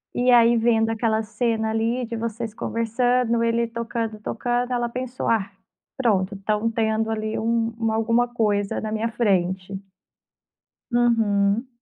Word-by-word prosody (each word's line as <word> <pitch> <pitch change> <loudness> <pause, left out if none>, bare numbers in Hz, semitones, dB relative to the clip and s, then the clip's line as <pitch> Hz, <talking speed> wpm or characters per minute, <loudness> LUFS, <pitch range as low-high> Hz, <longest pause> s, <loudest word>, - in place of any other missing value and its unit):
E 250 +1 +2
aí, 235 0 +6
vendo 225 -1 +2
aquela 220 -1 0
cena 220 0 -1
ali, 230 +3 0
de 230 - -5
vocês 230 0 -4
conversando, 230 +1 0
ele 230 0 +1
tocando, 230 -1 -4
tocando, 245 +3 -2
ela 240 -1 0
pensou: 255 +1 -5
"Ah, 205 -3 +1 0.5
pronto, 205 -6 +1
estão 210 +3 -1
tendo, 220 -1 0
ali, 215 0 -2
um 230 0 0
uma 225 -1 0
alguma 230 +2 +2
coisa 205 -4 0
na 215 - -4
minha 220 +1 -1
frente". 190 -3 -1 1.1
Uhum. 225 -2 +2
225 Hz, 135 wpm, -23 LUFS, 215-235 Hz, 1.1 s, aí